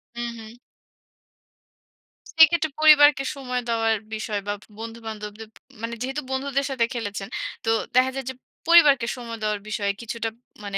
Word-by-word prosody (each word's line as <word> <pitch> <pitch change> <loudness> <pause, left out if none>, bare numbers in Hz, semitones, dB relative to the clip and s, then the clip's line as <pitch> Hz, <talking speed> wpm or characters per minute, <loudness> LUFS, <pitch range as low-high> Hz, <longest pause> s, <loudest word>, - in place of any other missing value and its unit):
হু, 240 - -4 0.2
হু। 225 +2 -12 1.8
সেক্ষেত্রে 320 0 +6
পরিবারকে 290 -3 +7
সময় 250 -2 -3
দেওয়ার 225 -1 +2 0.2
বিষয় 215 -1 -3
বা 205 - 0 0.3
বন্ধু-বান্ধবদের 220 -1 -7 0.3
মানে 230 +1 -4
যেহেতু 270 +3 -3
বন্ধুদের 275 +1 -1
সাথে 240 -3 +1
খেলেছেন 205 -4 -4 0.4
তো - - +1 0.3
দেখা 260 +1 +4
যায় 270 -2 -4
যে - - -4 0.3
পরিবারকে 290 -8 +6
সময় 230 -2 -7
দেওয়ার 210 -1 0
বিষয়ে 200 -2 0
কিছুটা 230 0 -3 0.3
মানে 200 -1 -3
235 Hz, 135 wpm, -24 LUFS, 220-270 Hz, 1.8 s, পরিবারকে